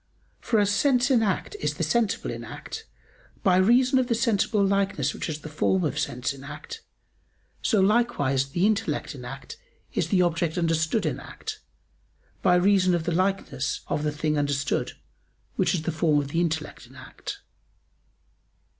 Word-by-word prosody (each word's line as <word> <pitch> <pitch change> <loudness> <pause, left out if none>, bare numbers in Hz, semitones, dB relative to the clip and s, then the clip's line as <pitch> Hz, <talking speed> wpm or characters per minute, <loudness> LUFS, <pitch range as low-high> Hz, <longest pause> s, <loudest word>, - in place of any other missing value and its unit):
For 225 - +1
as 205 -1 +3
sense 250 +4 +3
in 245 -3 +5
act 210 - -1
is - - -1
the - - -2
sensible 225 -2 0
in - - -6
act, 445 0 -8 0.6
by 185 -4 +4
reason 250 +7 +4
of 255 - +1
the 235 - +1
sensible 220 -3 +2
likeness 195 -8 +1
which - - -4
is 155 -1 -4
the - - -8
form 175 +5 +1
of 150 -1 -1
sense 135 -1 -2
in 135 -1 -12
act, 150 - -8 0.8
so 220 - +2
likewise 190 - +2
the 175 +7 +1
intellect 215 0 0
in - - -9
act - - -8 0.4
is - - 0
the 185 -3 +4
object 170 -1 0
understood 165 +4 +1
in 140 -3 -1
act, - - -7 0.8
by 180 -2 +4
reason 185 0 +4
of 170 - -1
the 175 - -1
likeness 185 -6 -1
of - - 0
the 150 - 0
thing 150 0 -1
understood, 145 -1 -1 0.6
which - - +2
is 160 - -2
the 170 - -1
form 155 -1 +2
of 140 -1 -1
the 165 +4 0
intellect 160 -2 -3
in - - -18
act. - - -8
180 Hz, 170 wpm, -26 LUFS, 155-210 Hz, 0.8 s, in